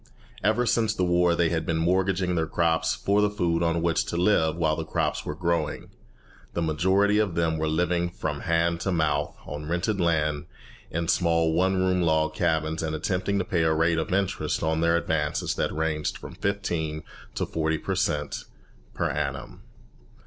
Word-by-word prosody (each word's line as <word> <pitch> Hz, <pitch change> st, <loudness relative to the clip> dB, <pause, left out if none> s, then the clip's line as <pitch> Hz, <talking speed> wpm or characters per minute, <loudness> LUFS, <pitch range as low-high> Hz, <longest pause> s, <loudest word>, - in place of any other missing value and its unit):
Ever 110 Hz, +4 st, +2 dB
since 110 Hz, -1 st, +1 dB
the 90 Hz, -, 0 dB
war 90 Hz, -1 st, +3 dB
they 85 Hz, -1 st, +2 dB
had 80 Hz, -1 st, -1 dB
been 85 Hz, -, -1 dB
mortgaging 90 Hz, +2 st, +1 dB
their 80 Hz, -2 st, 0 dB
crops 80 Hz, -1 st, +1 dB
for 100 Hz, +1 st, +1 dB
the 105 Hz, -, +3 dB
food 85 Hz, -5 st, 0 dB
on 85 Hz, 0 st, +1 dB
which 85 Hz, -1 st, +2 dB
to 85 Hz, -, -3 dB
live 85 Hz, -4 st, +3 dB
while 80 Hz, -2 st, +1 dB
the 80 Hz, -, -3 dB
crops 80 Hz, -, -1 dB
were 75 Hz, -, -3 dB
growing. 85 Hz, -2 st, -2 dB, 0.6 s
The 85 Hz, -, -1 dB
majority 95 Hz, +6 st, +2 dB
of 100 Hz, -6 st, 0 dB
them 80 Hz, -1 st, 0 dB
were 80 Hz, -, 0 dB
living 85 Hz, +2 st, +1 dB
from 75 Hz, -4 st, -4 dB
hand 85 Hz, +1 st, +1 dB
to 95 Hz, -, -1 dB
mouth 75 Hz, -4 st, 0 dB
on 75 Hz, +1 st, -6 dB
rented 90 Hz, +4 st, 0 dB
land, 75 Hz, -2 st, 0 dB, 0.4 s
in 85 Hz, +1 st, -2 dB
small 85 Hz, -3 st, +2 dB
one 95 Hz, +3 st, +2 dB
room 95 Hz, 0 st, +2 dB
log 80 Hz, -2 st, +2 dB
cabins, 80 Hz, -1 st, 0 dB
and 80 Hz, -1 st, -2 dB
attempting 95 Hz, +5 st, -1 dB
to 95 Hz, -, 0 dB
pay 90 Hz, -6 st, 0 dB
a 80 Hz, -1 st, +2 dB
rate 80 Hz, +1 st, +2 dB
of 80 Hz, -, -3 dB
interest 95 Hz, 0 st, 0 dB
on 80 Hz, 0 st, +1 dB
their 85 Hz, 0 st, +3 dB
advances 80 Hz, -3 st, -1 dB
that -, -, -1 dB
ranged 80 Hz, -1 st, -1 dB
from -, -, -10 dB
fifteen 85 Hz, -6 st, -2 dB, 0.3 s
to -, -, -1 dB
forty 80 Hz, 0 st, -1 dB
per -, -, -3 dB
cent. 75 Hz, -1 st, -1 dB, 0.5 s
per -, -, 0 dB
annum. -, -, -4 dB
85 Hz, 185 wpm, -26 LUFS, 80-90 Hz, 0.6 s, war